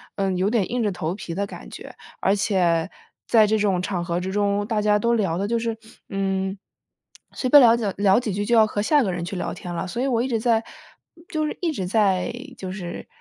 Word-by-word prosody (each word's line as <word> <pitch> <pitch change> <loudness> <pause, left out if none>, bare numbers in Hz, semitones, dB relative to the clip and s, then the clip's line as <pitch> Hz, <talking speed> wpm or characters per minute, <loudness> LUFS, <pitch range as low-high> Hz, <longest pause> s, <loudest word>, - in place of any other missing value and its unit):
嗯， 195 -2 -1
有 185 +2 +1
点 225 -2 0
硬 245 - 0
着 210 - +1
头 175 -2 -3
皮 175 -4 -7
的 200 +2 -1
感 - - -10
觉， - - -10 0.2
而 195 - +2
且 180 -4 +1 0.4
在 220 -2 +5
这 220 +1 +2
种 195 -4 +1
场 180 -2 -2
合 170 0 -1
之 185 +1 -4
中， 205 0 0
大 220 -1 0
家 210 0 +3
都 235 +2 +2
聊 190 -7 0
的 200 - -1
就 235 +2 0
是， 230 -1 -2 0.3
嗯， 195 0 -1 0.8
随 255 - -3
便 290 - +9
聊 235 -2 +7
几 235 - -3
聊 200 +1 +4
几 240 -4 -3
句 205 +2 -2
就 235 +2 +2
要 220 -1 +6
和 210 - -4
下 295 +6 +4
一 - - +2
个 195 - -1
人 175 -1 -4
去 190 +3 -5
聊 - - -3
天 175 - -7
了， 170 +1 -3
所 210 +6 -5
以 - - +1
我 235 -3 +1
一 255 - -1
直 230 -3 0
在 225 0 +2 0.7
就 310 -5 -1
是 - - -5
一 340 -3 0
直 190 -12 -4
在， 195 -2 +2 0.2
就 190 -4 -6
是 180 -3 -7
205 Hz, 265 characters per minute, -23 LUFS, 185-230 Hz, 0.8 s, 便